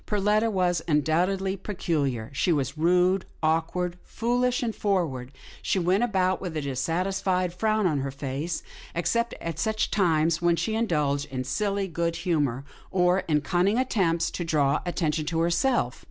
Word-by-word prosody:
Perletta 210 +2 +2
was 180 -5 +1
undoubtedly 180 +5 +1
peculiar 150 - -2
— - - -17
she 175 - +1
was 140 -3 0
rude, 180 +4 +3 0.2
awkward, 170 +3 0
foolish 245 +2 0
and 225 -2 -2
forward, 165 -12 -1
and - - -20 0.3
she - - 0
went 185 +5 +2
about 190 -5 +1
with 175 -4 -4
a - - -1
dissatisfied 180 +6 -1
frown 215 +2 +1
on 155 -5 +2
her 135 +1 -2
face, 140 +4 -4 0.3
except 235 +7 0
at 165 -2 -5
such 220 +4 0
times 165 -4 +2
when 175 -1 +3
she 220 +6 -1
indulged 150 -11 0
in 130 -2 -4
silly 195 +9 -1
good 170 -1 -1
humour, 145 -8 -1 0.2
or 180 0 +3
in 150 -2 +2
cunning 180 +7 +1
attempts 190 -10 +1
to 175 - -3
draw 150 -3 +2
attention 160 -3 -1
to 165 0 -1
herself. 170 - +1
175 Hz, 160 wpm, -26 LUFS, 155-195 Hz, 0.3 s, rude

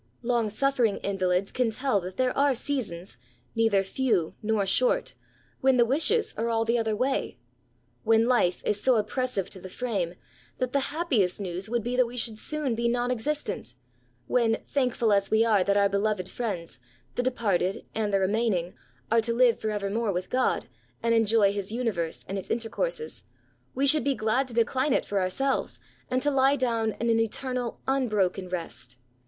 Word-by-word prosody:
Long 235 -2 +1
suffering 245 -1 +1
invalids 190 -1 0
can 250 -2 +1
tell 250 -1 0
that 185 0 -8
there 255 -1 +1
are 280 -1 +3
seasons, 225 -10 -4 0.4
neither 225 -4 +3
few 195 -5 0
nor 215 -2 +1
short, - - +1 0.5
when 265 -1 +3
the 240 - +5
wishes 425 - +1
are 230 +1 -1
all 225 0 +1
the 235 +1 +2
other 220 -1 0
way, 255 - -1 0.3
— 120 0 -41
^when 225 0 +5
life 235 -8 +2
is 210 -1 0
so 255 - +4
oppressive 230 -2 -1
to 190 - -9
the 185 - -9
frame 190 -6 -2 0.4
that 255 -1 -2
the 280 - +3
happiest 275 - 0
news 185 +1 -4
would 235 -1 0
be 245 +2 -2
that 250 -1 +3
we 245 +1 -8
should 225 -2 -1
soon 300 -3 -1
be 235 +1 0
non 245 +1 0
existent, 250 - -3 0.3
— 120 0 -39
when, 230 -3 +2 0.2
thankfrd 245 -5 +2
as 200 0 +1
we 220 +1 +4
are 210 -4 +4
that 200 +2 +2
our 200 0 +5
beloved 200 -1 0
friends, 185 - -4 0.3
the - - 0
departed 215 -6 0
and 215 -2 -1
the 195 - +3
remain 215 +3 +1
ing, 175 +1 -3 0.4
are 230 0 +5
to 230 +1 -1
live 240 -2 +4
for 215 - -2
evermore 210 +1 -1
with 180 0 -4
God, 255 0 +1 0.4
and 230 0 +3
enjoy 220 -3 +4
his 200 0 -4
universe 220 -9 -2
and 195 0 -3
its 190 - -9
intercourses, 460 - -2 0.5
we 275 - +1
should 305 +2 +5
be 275 -1 +1
108 - - -13
B8SAYS. 215 - -6
glad 250 +5 +2
to 245 - -8
decline 260 +4 +2
it - - +1
for 200 -1 0
ourselves, 265 +9 -1 0.3
and 255 0 0
to 290 - +2
lie 270 +1 +4
down 230 -5 0
in 235 0 +1
an 225 - +3
eternal, 245 +2 -2
unbroken 210 -9 0
rest. 165 -8 -5
225 Hz, 190 wpm, -27 LUFS, 200-255 Hz, 0.5 s, the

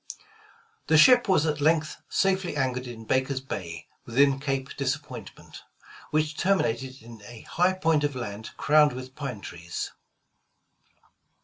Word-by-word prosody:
The 160 - +5
ship 245 +7 +7
was 175 -5 +4
at 150 -2 -1
length 155 0 +1
safely 190 -4 +1
anchored 130 -2 -1
in 115 -2 -9
Baker 130 +3 +1
*s - - -1
Bay, 90 -10 -6 0.2
within 135 +3 +3
Cape 135 -1 -2
Disappointment, 135 -5 -5 0.5
which 150 0 0
terminated 130 - 0
in 115 -2 -12
a 120 -2 -11
high 180 +2 +1
point 165 -5 +1
of 145 -2 -1
land 110 -3 -6
crowned 150 -1 +4
with 130 +1 -8
pine 130 -8 -5
trees. 85 -2 -6
135 Hz, 135 wpm, -26 LUFS, 120-155 Hz, 0.5 s, ship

